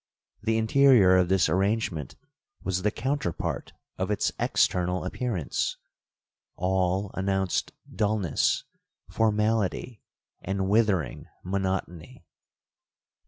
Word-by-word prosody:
The 110 +1 +1
interior 110 -4 +5
of 90 -1 +3
this 95 -3 +3
arrangement 95 - -1 0.5
was 95 -1 -1
the 105 - +2
counterpart 130 - -3 0.3
of 95 +1 -1
its 105 - +1
external 90 0 +1
appearance,—all 95 - -3
announced 95 -1 -1 0.2
dullness, 105 -4 +1 0.5
formality, 110 +1 0 0.4
and 95 0 -2
withering 100 - +1 0.2
monotony. 95 +1 -3
95 Hz, 80 wpm, -27 LUFS, 90-110 Hz, 0.5 s, interior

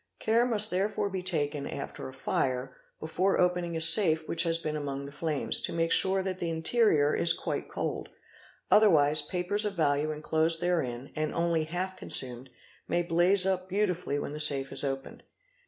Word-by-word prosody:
Care 230 +2 +1
must 215 -3 +6
therefore 200 +2 -2
be 190 -1 -4
taken, 150 -5 -2
after 140 - -7
a - - -13
fire, 130 -1 -3 0.2
before 180 +5 -1
opening 180 -2 -1
a - - -3
safe 160 -1 +5
which 165 - +1
has 165 -1 +1
been 155 -2 -5
among 140 -2 -5
the 140 - -10
flames, 150 0 -1
to - - -4
make 165 0 -1
sure 190 0 +4
that 185 -1 -5
the 170 - -3
interior 160 -2 +1
is 170 - +1
quite - - -5
cold; - - -5 0.6
otherwise 155 -8 +4
papers 180 +7 -3
of 205 -2 -3
value 150 -2 0
enclosed 160 +2 -1
therein 140 -8 -3
and 155 0 -3
only 170 -2 -1
half 180 +3 -4
consumed 125 -5 +1 0.4
may 175 - -1
blaze 175 +3 +4
up 185 -1 -2
beautifully 180 -7 -2
when 145 - -5
the 150 - -7
safe 140 -3 +3
is - - +1
opened. 135 -1 -6
165 Hz, 175 wpm, -28 LUFS, 145-185 Hz, 0.6 s, must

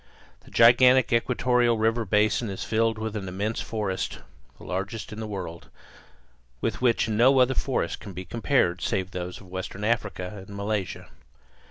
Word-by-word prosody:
The - - -19
gigantic 125 +2 +6
equatorial 120 0 +2
river 115 +1 +1
basin 105 +3 +2
is 95 - -5
filled 115 0 +1
with 110 0 -4
an 100 -3 -4
immense 100 +5 -2
forest, 105 -4 -3 0.4
the - - -15
largest 100 +4 -4
in 105 - -7
the 110 - -4
world, 90 -5 -7 0.9
with - - -2
which 120 -3 +2
no 120 +5 +4
other 130 +1 +4
forest 135 0 -1
can 100 - -9
be 90 +1 -7
compared 95 -3 +1
save 95 -3 -1
those 90 0 -5
of - - -14
western 95 +2 -6
Africa 105 -4 -1
and 100 - -9
Malaysia. 100 -1 -3
110 Hz, 160 wpm, -26 LUFS, 95-115 Hz, 0.9 s, gigantic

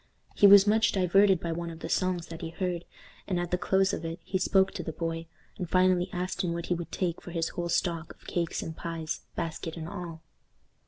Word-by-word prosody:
He 205 - +7
was 200 0 +9
much 220 +1 +3
diverted 190 0 +4
by 170 - -3
one 170 +1 -3
of 165 0 -9
the - - -4
songs 180 -1 0
that 165 +1 -8
he 165 - -4
heard, 175 0 -3 0.4
and 180 -2 0
at 175 -1 -3
the - - +3
close 190 +2 +2
of - - -3
it 165 +1 -4
he 190 - -1
spoke 190 0 +3
to 180 - -5
the 160 - -4
boy, 165 0 -4 0.3
and 180 -3 -3
finally 185 0 +3
asked 185 +2 -2
him 170 -2 0
what 170 0 -4
he - - 0
would 170 -1 -5
take 175 -3 -2
for - - -10
his 170 -1 -1
whole 175 -1 -4
stock 170 -1 -1
of - - -25
cakes 170 -2 -2
and 160 - -6
pies, 165 -2 -4
basket 165 0 -4
and 160 -1 -5
all. 170 -3 -7
175 Hz, 230 wpm, -29 LUFS, 165-185 Hz, 0.4 s, was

